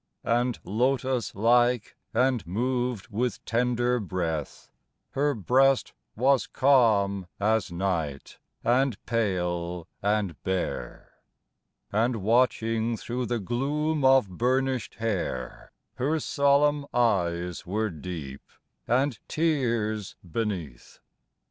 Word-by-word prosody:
And 120 +1 +1
lotos 125 +2 0
like 120 +2 +3 0.2
and 125 -4 +1
moved 120 +3 -1
with 120 +3 -2
tender 120 +1 +1
breath, 85 -7 -4 0.4
Her 145 +1 +1
breast 130 +6 +3 0.2
was 130 +3 +3
calm 105 -8 +3
as 110 -1 +1
night 85 -6 -3 0.2
and 125 -1 +2
pale 90 -6 -1
and 100 -6 0
bare, 95 -1 -4 0.7
And, 115 +4 +1
watching 115 +1 +1
thro' 125 +3 -3
the 120 0 -1
gloom 145 - -1
of 130 -4 +5
burnished 130 +5 0
hair, 100 - -3 0.3
Her 150 +5 +1
solemn 140 0 +2
eyes 90 -7 0
were 105 +3 -1
deep, 75 -4 -7 0.5
and 130 0 +1
tears 120 - 0
beneath. 85 - -4
115 Hz, 95 wpm, -27 LUFS, 95-130 Hz, 0.7 s, of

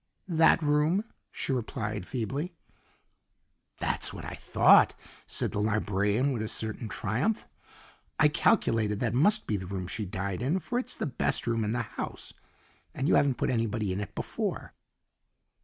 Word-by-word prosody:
"That 160 0 +5
room," 150 +7 +2 0.3
she 135 - -2
replied 105 -5 -3
feebly. 140 - -3 1.2
"That's - - -1
what - - -8
I - - -5
thought," - - +5 0.3
said - - +1
the 105 - -1
librarian 105 +4 +1
with 115 - -2
a 110 - -2
certain 110 +1 -3
triumph. 125 - -1 0.7
"I 150 - +7
calculated 110 -7 +2
that 115 -3 0
must 205 - +4
be 105 - 0
the 95 -1 -6
room 95 -1 -4
she 105 +4 -3
died 95 +1 -3
in, 140 +9 +1
for 240 +7 -2
it's 255 - -2
the - - -3
best 140 - 0
room 115 -1 0
in 105 +1 -1
the 120 -1 0
house, 105 - -7 0.6
and 135 - -1
you - - +4
haven't 140 -3 +3
put - - 0
anybody 110 -4 -1
in 95 - -3
it 100 - -7
before. - - -3
115 Hz, 160 wpm, -29 LUFS, 105-145 Hz, 1.2 s, I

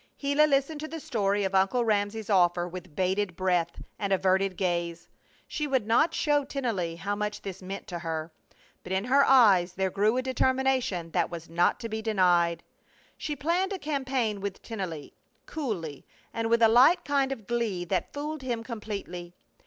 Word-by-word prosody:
Gila 285 +2 +3
listened 280 +2 +1
to 310 - -5
the 325 +1 -6
story 205 -6 0
of 190 0 -2
Uncle 195 +6 +2
Ramsey's 210 0 0
offer 175 -2 +3
with 180 -3 -9
bated 190 0 0
breath 175 -2 0 0.2
and 200 -1 -2
averted 190 0 +2
gaze. 170 -2 -2 0.4
She 300 - -3
would 265 -6 +1
not 235 +9 +3
show 295 -2 +2
Tennelly 230 -12 -2
how 200 +4 -3
much 210 0 -4
this 195 -1 -7
meant 190 +1 -6
to 175 -2 -4
her. 160 -1 -4 0.5
But 185 - -5
in 190 +1 0
her 270 +4 +4
eyes 200 -10 +5
there 190 0 -1
grew 210 +5 +2
a 255 - 0
determination 260 -9 0
that 175 -1 +1
was 170 -1 -8
not 175 +1 +2
to 230 - -3
be 220 0 -4
denied. 175 -6 +2 0.5
She 300 - -4
planned 345 +8 0
a - - -3
campaign 265 - -1
with 200 -1 -5
Tennelly, 185 -10 -6 0.3
coolly, 190 - -5 0.3
and 225 0 -1
with 235 0 +3
a - - +9
light 265 +10 +5
kind 275 -2 +1
of 225 -6 -5
glee 220 -6 -1
that 185 +2 -1
fooled 300 +1 -5
him 240 -3 -3
completely. 200 -7 -6
205 Hz, 175 wpm, -28 LUFS, 180-260 Hz, 0.5 s, a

